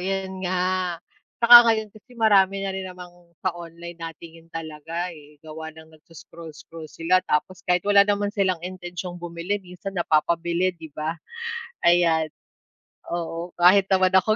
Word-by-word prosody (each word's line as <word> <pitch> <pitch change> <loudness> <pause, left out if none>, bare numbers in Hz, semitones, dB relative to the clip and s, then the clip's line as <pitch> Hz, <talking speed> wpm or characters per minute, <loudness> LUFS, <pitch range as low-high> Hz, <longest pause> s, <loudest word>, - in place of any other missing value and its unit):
yun 190 0 -3
nga. 185 -1 0 0.5
Saka 240 +1 +11
ngayon 220 -2 +1
kasi 220 +4 -18
marami 195 -4 +3
na 195 - -2
rin 190 0 -5
namang 180 -1 -10 0.3
sa 185 - +1
online 170 0 -10
natingin 165 0 -10
talaga, 165 +2 -5
eh, 150 -2 -15
gawa 160 0 -8
ng 160 0 -15
nagso-scroll-scroll 160 0 -12
sila, 165 +4 +1
tapos 165 +5 -1
kahit 180 -1 +2
wala 200 0 +5
naman 205 0 0
silang 185 -5 0
intensiyong 180 -1 -7
bumili 175 +4 -3
minsan 180 0 -9
napapabili, 170 +1 +1
'di 165 -3 -12
ba? 160 +2 -3 0.7
Ayan. 170 -2 +4 0.8
Oo 170 0 -5
kahit 185 +3 +5
naman 185 -1 +3
ako 195 +3 +4
175 Hz, 140 wpm, -24 LUFS, 165-190 Hz, 0.8 s, Saka